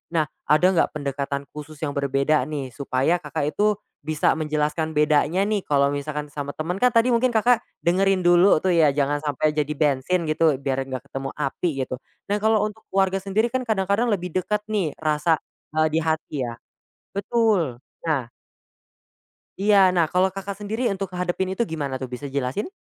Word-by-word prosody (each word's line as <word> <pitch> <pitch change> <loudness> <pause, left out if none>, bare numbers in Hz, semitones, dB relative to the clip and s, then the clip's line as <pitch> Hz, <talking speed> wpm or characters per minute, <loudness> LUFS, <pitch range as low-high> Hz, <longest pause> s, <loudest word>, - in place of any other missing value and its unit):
Nah, 155 - +4 0.2
ada 155 +4 +4
nggak 170 - +2
pendekatan 140 -1 -3
khusus 150 +1 -9
yang 145 - -1
berbeda 140 +1 +1
nih, 140 -4 -4
supaya 135 +5 0
Kakak 150 -1 -2
itu 210 0 +3 0.3
bisa 155 +1 +1
menjelaskan 155 0 -1
bedanya 150 +5 +3
nih. 210 -1 +1
Kalau 140 -1 +2
misalkan 150 +1 -4
sama 145 -1 -4
temen 175 +5 -3
kan 250 0 +5
tadi 235 +2 +4
mungkin 250 +2 +3
Kakak 240 +2 +4 0.2
dengerin 190 +2 +3
dulu 175 +1 +6
tuh 185 - +2
ya 160 -3 +5
jangan 145 0 +1
sampai 150 +1 +1
jadi 150 0 0
bensin 150 +4 +1
gitu 155 -1 +3
biar 135 -1 -1
nggak 130 -1 -4
ketemu 135 0 -4
api 150 +4 -1 0.2
gitu. 130 - -4 0.4
Nah 205 - +1
kalau 220 -1 +3
untuk 215 +1 -11
keluarga 195 0 +2
sendiri 200 +4 +1
kan 260 - +1
kadang-kadang 200 +2 +1
lebih 180 -3 -2
deket 200 +3 0
nih 185 -8 0
rasa, 155 +1 +2 0.4
eee, 155 0 +4
di 160 - +2
hati 155 -3 -2
ya. 115 - -6 0.6
Betul 200 - +1 0.3
nah 150 -6 0 1.4
Iya, 205 0 +4 0.2
nah 170 -2 +3
kalau 185 +3 +2
Kakak 195 +1 -5
sendiri 220 +4 -2
untuk 195 -1 -3
ngehadapin 180 +1 -2
itu 215 +5 0
gimana 140 -5 -3
tuh 130 - -4
bisa 130 +3 -7
jelasin? 140 - -2
160 Hz, 175 wpm, -23 LUFS, 145-195 Hz, 1.4 s, dulu